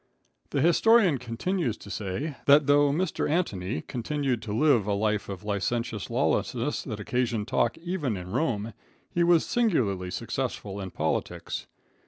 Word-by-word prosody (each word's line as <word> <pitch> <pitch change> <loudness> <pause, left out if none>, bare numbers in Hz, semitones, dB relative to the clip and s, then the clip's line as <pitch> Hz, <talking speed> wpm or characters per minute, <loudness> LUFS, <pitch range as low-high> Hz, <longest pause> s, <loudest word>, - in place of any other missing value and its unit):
The 140 - 0
historian 180 - +5
continues 125 - -2
to 100 - -11
say, 110 +11 -3
that 145 +1 +7
though 145 0 +5
Mr. 160 +2 0
Antony 100 - -1
continued 130 -1 -2
to 110 - -6
live 120 -2 +3
a 105 - +1
life 105 0 0
of 95 -1 -6
licentious 105 +2 -2
lawlessness, - - 0
that - - -5
occasioned 120 -4 -1
talk 120 -2 +1
even 165 - -2
in 90 0 -7
Rome, 115 -7 -1 0.4
he 175 - +2
was 170 -1 +4
singularly 115 - +1
successful 100 +2 -4
in 95 - -5
politics. 80 -2 -3
120 Hz, 145 wpm, -27 LUFS, 105-155 Hz, 0.4 s, that